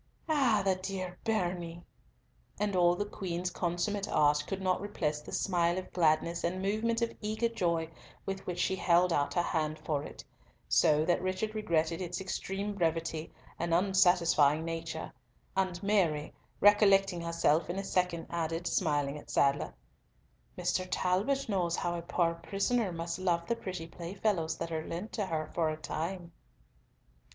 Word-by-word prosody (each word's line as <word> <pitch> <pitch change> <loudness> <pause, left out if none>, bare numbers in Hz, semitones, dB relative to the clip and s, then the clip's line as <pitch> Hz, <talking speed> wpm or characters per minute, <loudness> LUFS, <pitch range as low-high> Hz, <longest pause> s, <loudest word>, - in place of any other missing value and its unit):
"Ah! 260 -10 +3
the 190 - +4
dear 185 -1 -5
bairnie," 175 -6 -2 0.8
and 205 -2 0
all 175 -1 +4
the 205 - -2
Queen's 180 -3 -3
consummate 185 +4 -1
art 150 -1 +3
could 195 - -3
not 185 -1 0
repress 155 -7 -2
the - - -10
smile 175 -2 +1
of 185 - -6
gladness 170 0 +2
and 175 +2 0
the 190 +1 -2
movement 230 +2 0
of 230 - -2
eager 220 +2 0
joy 170 -7 0 0.4
with 195 0 -5
which 180 -1 -3
she 190 - +1
held 175 -1 +3
out 145 -2 0
her 175 - +3
hand 155 -2 -1
for 150 -2 -2
it, - - -9 0.4
so 150 +1 +4
that 175 +1 +2
Richard 185 +4 -2
regretted 165 -5 0
its 175 +1 -3
extreme 195 +2 -3
brevity 165 -3 -1 0.3
and 170 0 +1
unsatisfying 175 -5 +4
nature, 165 -1 -4 0.4
and 185 -2 -1
Mary, 175 -8 +1 0.3
recollecting 195 -3 +5
herself 170 -1 +1
in 180 - -2
a 195 - -2
second, 180 -3 0
added, 165 0 -2
smiling 145 -5 0
at - - -16
Sadler, 140 0 +2 0.9
"Mr. 185 - 0
Talbot 195 +11 +1
knows 180 -5 0
how 175 - -1
a 170 - -3
poor 170 0 +1
prisoner 200 +5 0
must 170 +1 -4
love 170 -2 +1
the 235 - 0
pretty 185 -6 -5
playfellows 170 0 -2
that 165 0 -4
are 160 -1 -2
lent 175 +7 -5
to 205 -3 -2
her 160 -3 -1
for 165 -2 +1
a 155 - -3
time." 170 +3 -4
175 Hz, 160 wpm, -31 LUFS, 165-195 Hz, 0.9 s, recollecting